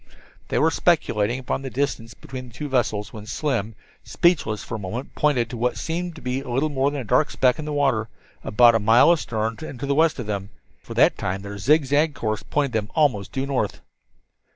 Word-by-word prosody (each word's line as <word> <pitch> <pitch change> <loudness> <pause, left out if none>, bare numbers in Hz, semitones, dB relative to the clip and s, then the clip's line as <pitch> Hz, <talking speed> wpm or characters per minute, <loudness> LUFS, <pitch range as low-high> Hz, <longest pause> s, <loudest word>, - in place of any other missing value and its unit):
They - - -1
were - - +3
speculating 105 +3 +1
upon 130 +1 -3
the 135 - -5
distance 125 -3 -3
between 130 -1 -8
the 120 - -16
two 150 +3 -4
vessels, 110 -6 -1
when 105 -1 -9
Slim, 115 -6 -2 0.3
speechless 155 - +1
for - - -8
the 110 - -4
moment, 115 +8 -5
pointed 140 -6 +1
to 120 - -5
what 125 +2 0
seemed 170 +1 -3
to 155 - -12
be 125 +1 -2
little 135 +3 -1
more 140 -1 +1
than 145 -1 -4
a - - -5
dark 145 +7 +2
speck 130 +1 +2
on 155 - -4
the 150 - -4
water 135 -7 +1 0.3
about 120 +2 +5
a 115 - +3
mile 115 +9 +6
astern 115 -8 -1
and 145 -5 -7
to - - -3
the 140 - +1
west 160 +2 +3
of 125 - -4
them 100 -1 -4 0.3
for - - -9
at - - -13
that - - +5
time 95 +1 -3
their 100 0 -7
zig 150 +4 +3
zag 145 +2 +2
course 110 -3 -2
pointed 140 +4 -1
them 110 -3 -2
almost 125 -11 +1
due 135 0 -2
north. 130 -7 -2
125 Hz, 225 wpm, -23 LUFS, 110-145 Hz, 0.3 s, mile